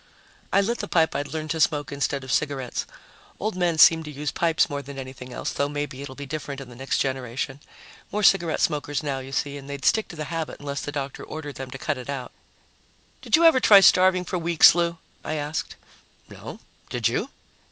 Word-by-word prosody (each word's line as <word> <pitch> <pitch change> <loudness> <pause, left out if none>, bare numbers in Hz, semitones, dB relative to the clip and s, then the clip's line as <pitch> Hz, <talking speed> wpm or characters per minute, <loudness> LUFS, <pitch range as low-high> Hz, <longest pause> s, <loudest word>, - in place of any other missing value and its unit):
I 200 - +4
lit 235 +4 -1
the 205 - -4
pipe 165 -4 +2
I'd 145 - -2
learned 155 -1 -4
to 165 - -2
smoke 145 -1 +1
instead 140 0 -2
of 130 - -6
cigarettes 140 -4 -1 0.5
old 215 -1 -2
men 175 -3 +1
seem 160 +1 +7
to - - -7
use 150 0 -4
pipes 165 +1 +2
more 145 0 -4
than 140 0 -10
anything 130 -1 -8
else, - - -4
though 140 0 0
maybe 145 -2 -4
it'll 135 -2 -8
be 140 - -7
different 145 -1 -5
in 135 -2 -9
the 120 - -12
next 135 +3 -2
generation. 130 0 -3 0.5
More 210 +1 -1
cigarette 175 -5 +3
smokers 145 -1 -1
now, 140 -2 -2
you 135 +1 -9
see, 140 +2 -2
and 140 0 -11
they'd 140 -1 -6
stick 220 -1 +3
to - - -10
the 155 - -4
habit 165 -1 -4
unless 140 0 -4
the 145 - -5
doctor 140 -2 -5
ordered 150 -2 -7
them 135 -1 -6
to 135 - -7
cut 145 0 -2
it 125 - -9
out. 135 -3 -5 0.9
"Did - - +3
you 335 +1 +4
ever 325 -6 +7
try 205 -5 +8
starving 185 -1 +5
for 180 - -2
weeks, 170 -1 +6
Lou?" 170 0 0 0.3
I 155 - -3
asked. 150 +1 -3 0.5
"No. - - -10 0.3
Did - - 0
you?" - - -1
145 Hz, 215 wpm, -24 LUFS, 135-165 Hz, 0.9 s, try